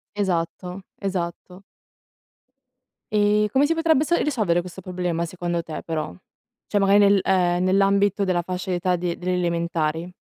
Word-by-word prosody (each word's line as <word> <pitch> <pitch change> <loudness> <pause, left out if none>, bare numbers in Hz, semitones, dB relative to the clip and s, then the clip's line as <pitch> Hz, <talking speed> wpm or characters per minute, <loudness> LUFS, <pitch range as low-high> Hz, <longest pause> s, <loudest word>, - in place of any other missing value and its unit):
Esatto. 180 -1 -2 0.2
Esatto. 180 -1 -4 1.5
Ehm, 210 0 +3
come 270 +6 +3
si 330 - +2
potrebbe 325 -3 +3
s 345 +3 +1
risolvere 210 - +1
questo 180 +2 -10
problema 180 -2 -2
secondo 175 0 -3
te, 160 -1 -7
però? 155 - -4 0.5
Cioè 205 - +1
magari 195 0 +4
nel 200 -1 +5
ehm, 180 -2 +2
nell'ambito 200 +1 +2
della 185 -2 +1
fascia 185 +1 -4
d'età 180 0 +1
de 175 -1 -3
delle 180 0 -2
elementari? 170 -1 -1
180 Hz, 140 wpm, -23 LUFS, 175-200 Hz, 1.5 s, nel